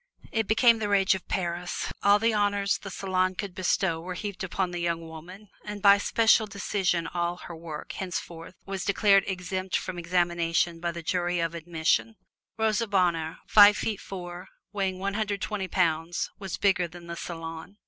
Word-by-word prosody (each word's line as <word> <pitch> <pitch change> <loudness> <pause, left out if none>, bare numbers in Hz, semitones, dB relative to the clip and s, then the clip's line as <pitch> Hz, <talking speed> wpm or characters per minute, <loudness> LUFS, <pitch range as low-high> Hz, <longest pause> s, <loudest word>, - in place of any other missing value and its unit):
It 225 -2 0
became 230 +1 +5
the 210 -1 -2
rage 195 -2 +4
of 190 - -6
Paris. 175 -1 -3
All 200 +1 +6
the 225 +2 +1
honors 205 -1 +1
the 195 - -8
Salon 185 -1 0
could 200 -1 -5
bestow 180 -2 0
were 180 +1 -6
heaped 200 0 -5
upon 190 0 -2
the 175 - -4
young 170 -1 -1
woman, 180 +6 -11
and 210 -1 -6
by 200 0 +6
special 220 +1 +3
decision 190 -4 -1
all 175 0 -2
her 175 - -9
work 160 -2 -7
henceforth 175 -2 -6
was 195 -1 -4
declared 200 -1 +4
exempt 185 0 -2
from 180 -2 -5
examination 170 -1 +1
by 170 0 -2
the 170 0 -7
Jury 175 +1 0
of 165 0 -1
Admission. 170 +6 0 0.4
Rosa 220 +1 +1
Bonheur, 170 -5 +1
five 205 -1 +8
feet 215 -3 -2
four, 175 -2 -7 0.3
weighing 190 -2 -1
one 195 +1 -2
hundred 205 -1 -1
twenty 200 -2 -3
pounds, 170 -1 0
was 195 -3 -5
bigger 190 -3 +2
than 175 0 -12
the 170 0 -6
Salon. 165 +3 -7
185 Hz, 175 wpm, -27 LUFS, 170-200 Hz, 0.4 s, five